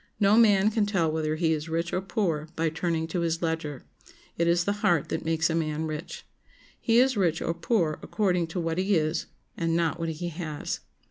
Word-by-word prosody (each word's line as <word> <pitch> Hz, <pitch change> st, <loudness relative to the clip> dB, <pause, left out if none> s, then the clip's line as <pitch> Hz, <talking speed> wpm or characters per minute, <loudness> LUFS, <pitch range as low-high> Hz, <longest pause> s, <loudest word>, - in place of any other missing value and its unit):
No 205 Hz, 0 st, +5 dB
man 210 Hz, -2 st, +5 dB
can 215 Hz, -2 st, +1 dB
tell 175 Hz, -6 st, +1 dB
whether 155 Hz, -1 st, -1 dB
he 160 Hz, 0 st, +2 dB
is 155 Hz, +1 st, -4 dB
rich 165 Hz, +1 st, -2 dB
or 185 Hz, -, +1 dB
poor 175 Hz, -5 st, -1 dB
by 165 Hz, 0 st, +1 dB
turning 165 Hz, 0 st, -1 dB
to 175 Hz, -, -1 dB
his 170 Hz, 0 st, -1 dB
ledger. 160 Hz, -4 st, -2 dB, 0.5 s
It 170 Hz, -, +1 dB
is 170 Hz, 0 st, +3 dB
the 200 Hz, -, 0 dB
heart 170 Hz, -5 st, +2 dB
that -, -, -2 dB
makes 165 Hz, 0 st, +2 dB
a 165 Hz, -, -1 dB
man 160 Hz, -1 st, -1 dB
rich. 155 Hz, +2 st, -6 dB, 0.5 s
He 230 Hz, 0 st, +2 dB
is 260 Hz, +1 st, +4 dB
rich 170 Hz, -6 st, +1 dB
or 165 Hz, -, -1 dB
poor 170 Hz, -3 st, 0 dB
according 180 Hz, -5 st, 0 dB
to 165 Hz, +3 st, -4 dB
what 165 Hz, 0 st, -1 dB
he 195 Hz, +2 st, +2 dB
is, 155 Hz, 0 st, 0 dB, 0.3 s
and 165 Hz, 0 st, 0 dB
not 170 Hz, -1 st, 0 dB
what 165 Hz, 0 st, -2 dB
he 165 Hz, +2 st, -4 dB
has. 155 Hz, -3 st, -4 dB
165 Hz, 210 wpm, -27 LUFS, 160-185 Hz, 0.5 s, No